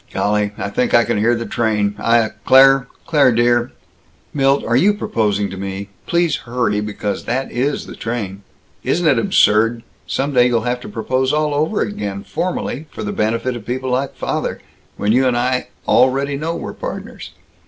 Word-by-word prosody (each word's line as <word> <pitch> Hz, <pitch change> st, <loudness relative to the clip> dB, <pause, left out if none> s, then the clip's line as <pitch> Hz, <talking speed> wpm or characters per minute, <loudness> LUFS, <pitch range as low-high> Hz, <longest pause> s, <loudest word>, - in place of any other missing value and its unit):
"Golly, 105 Hz, 0 st, 0 dB
I -, -, -3 dB
think 125 Hz, -, +1 dB
I 120 Hz, -, +6 dB
can 115 Hz, -2 st, -1 dB
hear 120 Hz, +3 st, +3 dB
the 115 Hz, 0 st, -4 dB
train. 105 Hz, -4 st, 0 dB
I, 115 Hz, 0 st, +3 dB
uh, 110 Hz, -, -1 dB
Claire, 135 Hz, 0 st, +6 dB, 0.2 s
Claire 145 Hz, -5 st, +4 dB
dear 120 Hz, +1 st, +2 dB, 0.3 s
" -, -, -36 dB
"Milt, 135 Hz, -1 st, +2 dB
are 120 Hz, -, +1 dB
you 200 Hz, +11 st, +4 dB
proposing 105 Hz, -, -1 dB
to 95 Hz, -, -7 dB
me? 100 Hz, +1 st, -5 dB, 0.2 s
Please 170 Hz, -3 st, +1 dB
hurry, 120 Hz, -4 st, -1 dB
because 105 Hz, -1 st, -4 dB
that 130 Hz, +3 st, -2 dB
is 135 Hz, +4 st, -1 dB
the -, -, -9 dB
train. 105 Hz, -4 st, -4 dB, 0.4 s
Isn't 175 Hz, -, 0 dB
it 140 Hz, -6 st, +4 dB
absurd 115 Hz, +1 st, +3 dB, 0.2 s
some 140 Hz, +2 st, -1 dB
day 125 Hz, -1 st, +5 dB
you'll 120 Hz, -2 st, +1 dB
have 125 Hz, +2 st, -2 dB
to -, -, -8 dB
propose 130 Hz, +5 st, -1 dB
all 150 Hz, 0 st, +1 dB
over 155 Hz, +8 st, 0 dB
again 100 Hz, -, -3 dB
formally, 165 Hz, -4 st, -3 dB
for -, -, -7 dB
the 105 Hz, -, -3 dB
benefit 115 Hz, +4 st, -1 dB
of 115 Hz, -3 st, -9 dB
people 130 Hz, +1 st, -2 dB
like 130 Hz, +2 st, -1 dB
father, -, -, -3 dB, 0.4 s
when 105 Hz, -, 0 dB
you 130 Hz, +3 st, +3 dB
and 120 Hz, -1 st, +1 dB
I 125 Hz, +1 st, 0 dB, 0.2 s
already 135 Hz, +2 st, +3 dB
know 160 Hz, +4 st, -3 dB
we're -, -, -6 dB
partners! -, -, -7 dB
120 Hz, 185 wpm, -18 LUFS, 110-135 Hz, 0.4 s, I